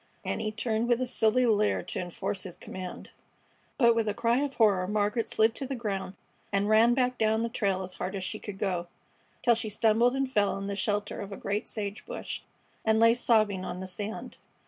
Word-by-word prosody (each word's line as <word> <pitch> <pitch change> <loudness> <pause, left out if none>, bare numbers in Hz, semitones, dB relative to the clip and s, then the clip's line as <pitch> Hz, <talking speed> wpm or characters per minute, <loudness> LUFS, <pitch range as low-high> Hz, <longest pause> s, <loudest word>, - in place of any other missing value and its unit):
And - - -2
he 215 -1 -1
turned 220 +1 -1
with 240 -1 +3
a 255 - 0
silly 245 0 +2
leer 210 -2 +2
to - - -4
enforce 180 +2 -3
his 185 -3 -6
command; 185 -1 -8 0.7
but 235 -4 +6
with 230 -1 0
a 210 - 0
cry 235 +3 +2
of 280 -1 -2
horror 200 -5 +3
Margaret 210 +3 0
slid 220 +1 +3
to 270 +2 -4
the 270 - -3
ground 200 -5 -3 0.4
and 200 0 +1
ran 225 +3 +5
back 250 -1 +1
down 220 +1 +2
the 230 - -1
trail 195 -4 0
as 185 0 -7
hard 185 +2 -4
as 190 - -3
she 185 +3 -4
could 205 -2 -7
go, 180 -3 -1 0.6
till 240 - +6
she 225 -1 -1
stumbled 225 +4 +3
and 270 0 0
fell 205 -7 +1
in 195 - -5
the 200 0 -3
shelter 205 +2 -1
of 200 0 -7
a 195 - -6
great 205 +1 -2
sage 205 -1 -4
bush, - - -5 0.4
and 220 0 +3
lay 230 0 +6
sobbing 215 -5 +2
on 180 - -5
the 190 - -5
sand. 205 +4 -5
215 Hz, 215 wpm, -29 LUFS, 195-230 Hz, 0.7 s, but